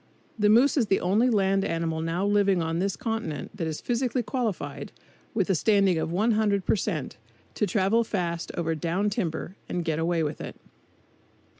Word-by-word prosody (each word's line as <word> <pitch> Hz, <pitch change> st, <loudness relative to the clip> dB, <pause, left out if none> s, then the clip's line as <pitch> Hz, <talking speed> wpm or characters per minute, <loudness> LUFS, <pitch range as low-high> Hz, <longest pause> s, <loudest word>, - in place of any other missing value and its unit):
The 210 Hz, 0 st, +4 dB
moose 245 Hz, +8 st, +5 dB
is 235 Hz, -6 st, +2 dB
the 195 Hz, -, +2 dB
only 210 Hz, +8 st, +2 dB
land 195 Hz, -3 st, +2 dB
animal 165 Hz, -2 st, -1 dB
now 165 Hz, +4 st, -1 dB
living 200 Hz, -2 st, +3 dB
on 165 Hz, 0 st, -1 dB
this 195 Hz, +1 st, 0 dB
continent 225 Hz, -, -4 dB
that 170 Hz, -6 st, -3 dB
is 155 Hz, -1 st, -4 dB
physically 245 Hz, 0 st, 0 dB
qualified, 225 Hz, -3 st, -3 dB, 0.4 s
with 200 Hz, -5 st, +1 dB
a 195 Hz, -, +2 dB
standing 195 Hz, -1 st, +3 dB
of 160 Hz, -, -2 dB
100 210 Hz, 0 st, +1 dB
per -, -, +3 dB
cent, 175 Hz, -9 st, -3 dB, 0.4 s
to 210 Hz, -, 0 dB
travel 210 Hz, +4 st, +2 dB
fast 170 Hz, -6 st, -3 dB
over 165 Hz, -1 st, 0 dB
"down 175 Hz, +6 st, -1 dB
timber" 180 Hz, -3 st, -3 dB
and 175 Hz, -2 st, -2 dB
get 160 Hz, -1 st, 0 dB
away 165 Hz, 0 st, +1 dB
with 150 Hz, 0 st, -3 dB
it. -, -, -7 dB
195 Hz, 175 wpm, -26 LUFS, 165-215 Hz, 0.4 s, moose